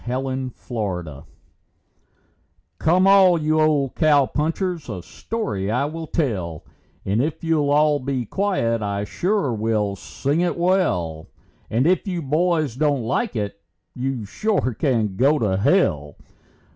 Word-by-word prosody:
A 125 +2 -1
MAN - - -3
NAMED 130 -1 -3
HODS 90 - -4 1.5
Come, 180 +4 +3
all 190 -3 +6
you 155 0 +1
old 145 -4 +2
cowpunchers, 155 +3 +1
a 95 -5 -5
story 105 - -4
I 125 +6 +1
will 160 +2 -5
tell, 95 - -2 0.4
And 100 +4 +1
if 155 +4 -3
you'll 160 -3 +1
all 150 0 +3
be 130 -2 -2
quiet, 115 - 0
I 100 -1 -2
sure 180 - -1
will 105 -2 0
sing 140 - -2
it 175 - 0
well; 95 - 0 0.4
And 120 +5 +1
if 180 +3 +2
you 175 -3 -2
boys 155 -2 +1
don't 145 -3 +1
like 130 - -1
it, 100 -2 -4 0.3
you 130 -3 -3
sure 190 - -1
can 110 -7 0
go 140 +5 +4
to 105 -7 0
hell. 85 - +1
135 Hz, 140 wpm, -22 LUFS, 105-165 Hz, 1.5 s, all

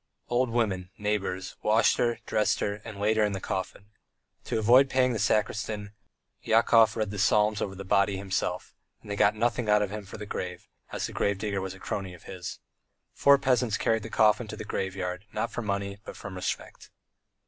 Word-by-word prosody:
Old 120 +1 +2
women, 100 -6 -1
neighbours, 100 -3 -2
washed 110 +1 +3
her, 120 -1 +1
dressed 105 -1 +1
her, 105 +1 -2
and 110 -3 -8
laid 110 +2 +2
her 110 - +4
in 105 -1 +1
the 95 - -3
coffin. 95 +2 -5 0.5
To - - -1
avoid 125 +5 +6
paying 130 -1 +2
the 110 - -2
sacristan, 105 0 0 0.5
Yakov 115 0 +4
read 110 -2 -1
the 100 - -5
psalms 105 +1 +3
over 95 -1 -3
the 100 +1 -8
body 100 0 +2
himself, 95 -1 -3 0.3
and 105 - -8
they - - -1
got 100 +1 +3
nothing 115 0 0
out 105 0 +5
of 100 - -3
him 105 0 -5
for - - -9
the 105 - -7
grave, 90 -3 -5 0.2
as - - -2
the - - -6
grave 100 -1 0
digger 100 -1 -2
was 95 0 -5
a - - -14
crony 95 -1 -4
of 85 - -17
his. 90 -1 -7 0.6
Four 140 0 +6
peasants 125 -5 +1
carried 115 0 +1
the 110 - -7
coffin 110 +1 +3
to 110 - -7
the 110 - -6
graveyard, 95 -1 -3
not 115 - -2
for - - -4
money, 100 -2 -3
but - - -9
from 100 - -8
respect. 90 0 -5
105 Hz, 205 wpm, -28 LUFS, 100-110 Hz, 0.6 s, avoid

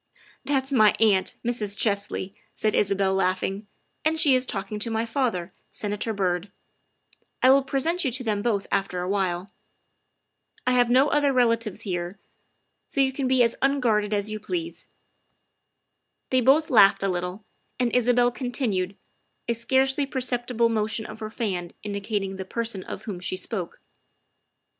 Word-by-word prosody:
" - - -29
That 270 -1 +1
is 270 +1 -4
my 215 -5 +5
aunt, 205 -4 +3
Mrs. 215 -4 -1
Chesley," 200 -2 -1 0.2
said 215 - 0
Isabel, 195 -1 +2
laugh 185 -1 +1
ing, 200 +2 -3
' - - -45
' - - -47
and 315 +1 +1
she 295 -4 +5
is 255 0 +2
talking 205 +1 -4
to 230 - -1
my 225 0 -1
father, 225 -8 -2 0.2
Senator 210 +2 -3
Byrd; 185 -2 -1 0.9
I 260 - +8
will 275 +1 +6
present 300 +7 0
you 270 - +1
to 255 +1 -1
them 210 -3 -1
both 205 -3 0
after 185 -2 -1
awhile. 185 0 -1 1.1
I 255 - +3
have 245 -1 +3
no 260 +4 +4
other 290 -1 +2
relatives 230 -4 +1
here, 180 -2 -4 0.7
so - - -4
you 265 -1 +4
can 265 -1 -1
be 255 -1 +4
as 230 - +1
unguarded 240 -7 +2
as 205 0 0
you 215 - -4
please." 335 - -5 1.4
They 255 -1 +3
both 285 +6 +4
laughed 200 -5 +6
a - - +2
little, 180 +3 -3 0.3
and 245 -1 +1
Isabel 245 0 +3
continued, 235 -7 -2 0.5
a 235 - +2
scarcely 265 +4 +1
perceptible 245 -3 0
motion 220 -1 -1
of 215 +1 -9
her 215 -1 -5
fan 190 -6 -3
indicating 200 -1 -3
the 190 - -4
person 225 -2 -3
of - - -7
whom 195 -5 -5
she 185 +1 -2
spoke. 185 -1 -5
220 Hz, 165 wpm, -25 LUFS, 195-255 Hz, 1.4 s, I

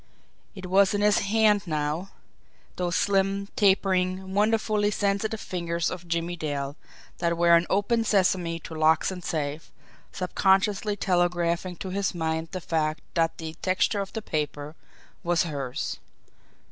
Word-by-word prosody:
It 190 -2 -8
was 195 +2 +4
in 205 - 0
his 210 -1 +4
hand 210 -1 +2
now, 155 +4 -2 0.7
those 180 -1 -1
slim, 195 0 +1
tapering, 190 -1 +2
wonderfully 215 0 +2
sensitive 210 +1 -1
fingers 170 -3 -2
of 180 -1 -7
Jimmie 170 +1 -1
Dale, 145 -3 -3 0.4
that 170 0 0
were 170 0 +6
an 170 +1 +2
"open 215 +4 +2
sesame" 185 -5 +1
to 160 - -9
locks 160 +3 +3
and 180 -2 -7
safes, 150 -1 -3 0.4
subconsciously 195 +3 +1
telegraphing 175 -1 0
to 190 - -6
his 195 -1 -1
mind 160 -1 -1
the 185 - -4
fact 155 -2 -1
that 165 -1 +1
the 160 -1 -6
texture 190 +2 +1
of 195 - -6
the 220 - -4
paper 150 -1 -3 0.5
was 175 0 +2
hers. 140 -6 -4
180 Hz, 140 wpm, -26 LUFS, 165-200 Hz, 0.7 s, were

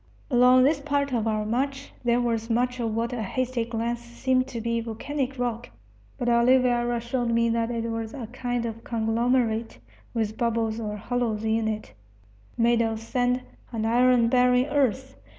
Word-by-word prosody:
Along 250 +1 +6
this 285 +2 +3
part 280 -1 -1
of 225 -2 0
our 215 -1 0
march 270 +5 -2
there 240 0 +2
was 230 -1 -1
much 250 +2 0
of 225 -2 -1
what 230 +2 -1
at 245 - -3
a - - -2
hasty 245 +3 -1
glance 235 +1 -2
seemed 255 +2 0
to 245 -3 -5
be 230 0 -1
volcanic 265 +4 -4
rock; 240 -2 -3 0.5
but 245 - -3
Oliveira 240 0 +3
showed 240 +1 -2
me 230 0 +2
that 230 0 0
it 230 -1 -2
was 225 -1 -3
a 255 -4 -5
kind 245 0 -3
of 230 0 -6
conglomerate, 230 - 0 0.3
with 220 -1 -2
bubbles 230 -1 0
or 210 -2 -4
hollows 225 -1 -2
in 220 0 +1
it, 215 - -4 0.6
made 235 0 +3
of 225 -1 -1
sand 245 +2 0 0.3
and 225 -2 -2
iron 245 +1 +4
bearing 250 +1 +4
earth. 265 -2 0
235 Hz, 170 wpm, -26 LUFS, 225-250 Hz, 0.6 s, Along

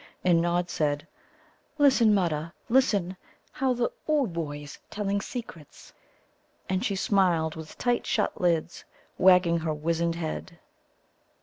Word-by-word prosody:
And 175 -2 +4
Nod 175 +1 0
said: 145 -3 -1 0.7
"Listen, 265 -6 +5
Mutta, 170 -4 0 0.2
listen; 205 -8 +2 0.4
how 260 -1 0
the 240 0 0 0.2
Ooboë's 165 - -2
telling 200 -1 -2
secrets!" 185 - -9 0.7
And 185 +2 -1
she 200 -5 0
smiled 180 -5 +1
with 160 -1 -10
tight 245 -1 0
shut 210 - -1
lids, 170 -1 0 0.4
wagging 180 -2 +5
her 160 -1 -2
wizened 165 +2 -1
head. 170 +1 -5
175 Hz, 115 wpm, -27 LUFS, 165-205 Hz, 0.7 s, Listen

